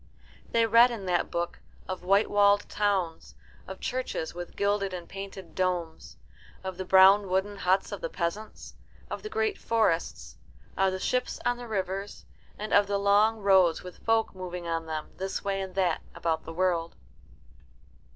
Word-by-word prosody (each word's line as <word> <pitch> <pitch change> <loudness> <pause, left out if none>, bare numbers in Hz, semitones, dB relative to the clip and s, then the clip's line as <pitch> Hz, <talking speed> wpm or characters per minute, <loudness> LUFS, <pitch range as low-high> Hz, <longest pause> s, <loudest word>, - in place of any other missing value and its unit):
They 230 0 +3
read 230 +2 +6
in 225 -5 -6
that 180 -1 0
book 170 0 -3 0.3
of 185 -1 -5
white 195 +3 +3
walled 205 0 +3
towns, 195 -5 -1 0.3
of 190 0 -8
churches 255 -10 -3
with 175 0 -8
gilded 200 -1 0
and 175 -1 -8
painted 195 -1 -8
domes, 175 - -2 0.5
of 190 -1 -5
the 185 - -4
brown 190 +2 +6
wooden 190 +2 0
huts 190 0 +1
of - - -5
the - - -3
peasants, 200 - -5 0.4
of - - -4
the 425 - -6
great 440 -2 -1
forests, 170 - 0 0.4
of 190 0 +2
the 190 - -3
ships 250 +6 -1
on 245 0 +1
the 245 0 -8
rivers, 195 -1 -4 0.3
and 215 +1 -4
of 205 0 +5
the 200 0 0
long 205 +2 +3
roads 190 -4 +4
with 180 -1 -10
the - - -25
folk 225 -1 +2
moving 180 -2 -6
on 165 -1 -2
them, 155 -1 -5
this 190 +1 -3
way 195 -1 -1
and 190 -1 -6
that, 180 -4 +1
about 160 -1 -1
the 165 - -7
world. 170 -1 0
190 Hz, 170 wpm, -28 LUFS, 180-205 Hz, 0.5 s, read